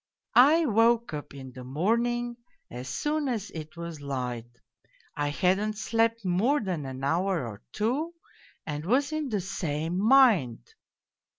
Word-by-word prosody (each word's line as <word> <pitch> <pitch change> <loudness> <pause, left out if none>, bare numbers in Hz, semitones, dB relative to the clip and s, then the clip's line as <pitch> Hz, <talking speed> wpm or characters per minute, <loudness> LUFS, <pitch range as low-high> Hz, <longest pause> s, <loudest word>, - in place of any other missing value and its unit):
I 305 +7 +6
woke 230 - +3
up 145 -1 -6
in 130 -1 -9
the 125 0 -10
morning 235 - 0 0.3
as 125 +2 -7
soon 295 - -1
as 220 -5 -3
it 155 0 -8
was 170 -3 -7
light, 125 -4 -4 0.7
I 145 0 -1
hadn't 190 +8 +1
slept 225 +1 0
more 215 +12 +2
than 180 - -3
an 130 0 -7
hour 170 +1 0
or 105 -3 -9
two, 280 +11 -1 0.5
and 150 -1 -4
was 265 - +1
in 310 -3 -2
the 210 -4 -1
same 170 -2 -3
mind. 220 - +4
190 Hz, 140 wpm, -28 LUFS, 145-235 Hz, 0.7 s, I